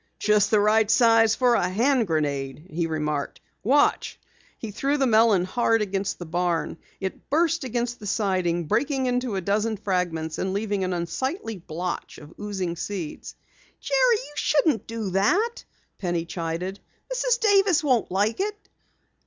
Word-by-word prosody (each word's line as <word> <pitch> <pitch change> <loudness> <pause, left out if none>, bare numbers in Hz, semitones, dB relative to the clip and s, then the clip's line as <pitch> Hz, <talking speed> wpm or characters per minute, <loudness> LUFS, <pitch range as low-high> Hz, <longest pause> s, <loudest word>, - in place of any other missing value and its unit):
"Just 210 -1 +3
the 215 - +4
right 215 +1 +3
size 225 -2 +5
for 250 -2 +3
a 180 -6 +2
hand 235 +4 +2
grenade," 145 -2 -2
he 165 +1 -1
remarked. 150 -2 -3 0.2
"Watch!" 280 +6 +2 0.4
He 225 - -6
threw 275 +8 0
the 275 - +2
melon 220 -5 +4
hard 225 +2 +1
against 195 -1 -2
the 175 - -7
barn. 170 0 -1 0.2
It 190 -1 -6
burst 330 +1 +2
against 240 -1 -2
the 210 - -7
siding, 185 -4 0
breaking 265 - 0
into 250 -3 -1
a 190 - -1
dozen 210 +4 0
fragments 175 -5 -2
and 190 0 -1
leaving 205 -1 -1
an 185 0 -1
unsightly 225 - -3
blotch 175 +1 -5
of 150 +1 -13
oozing 190 -4 -3
seeds. 175 -4 -6 0.4
"Jerry, - - +3
you 295 - -12
shouldn't 295 -4 +1
do 225 -4 -4
that," 380 - +1 0.4
Penny 175 -3 -1
chided. 170 +3 -4 0.3
"Mrs. - - +1
Davis 395 -7 +4
won't 255 -6 +2
like 205 - 0
it." 415 +1 -1
210 Hz, 155 wpm, -25 LUFS, 180-250 Hz, 0.4 s, size